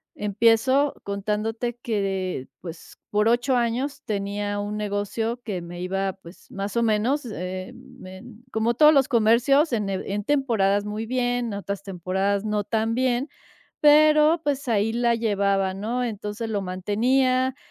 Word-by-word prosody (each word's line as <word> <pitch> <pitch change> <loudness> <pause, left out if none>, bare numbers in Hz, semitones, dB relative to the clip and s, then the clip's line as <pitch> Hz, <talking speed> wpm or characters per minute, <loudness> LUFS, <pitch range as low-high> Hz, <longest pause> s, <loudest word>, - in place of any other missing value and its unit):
empiezo 230 +7 +2
contándote 215 +4 -3
que 220 -4 -1
de 185 -8 -3
pues, 165 -2 -10
por 210 +1 +2
8 245 +2 +2
años 250 +5 -1
tenía 205 -1 -3
un 205 +1 -4
negocio 210 +3 -2
que 200 -6 -4
me 175 +1 -9
iba, 195 +1 -2
pues, 180 -1 -16
más 200 +1 -5
o 235 - +2
menos, 230 +6 +1
em, 210 +6 -7
em, 210 +5 -12
como 225 +2 +1
todos 300 +5 +6
los 275 -3 +4
comercios, 245 +6 +3
en 210 -4 -1
en 195 +1 -3
temporadas 220 -8 +1
muy 210 +2 -4
bien, 245 0 -1
en 215 - -4
otras 200 0 -5
temporadas 195 +2 -1
no 210 -1 -1
tan 225 +1 -1
bien. 255 +2 0 0.5
Pero, 305 +2 +5
pues, 280 -2 -2
ahí 225 -1 +1
la 235 0 +1
llevaba, 200 -4 0
¿no? 230 +5 -2
Entonces 215 0 -4
lo 205 -2 -2
mantenía, 255 +8 +1
220 Hz, 150 wpm, -24 LUFS, 200-245 Hz, 0.5 s, todos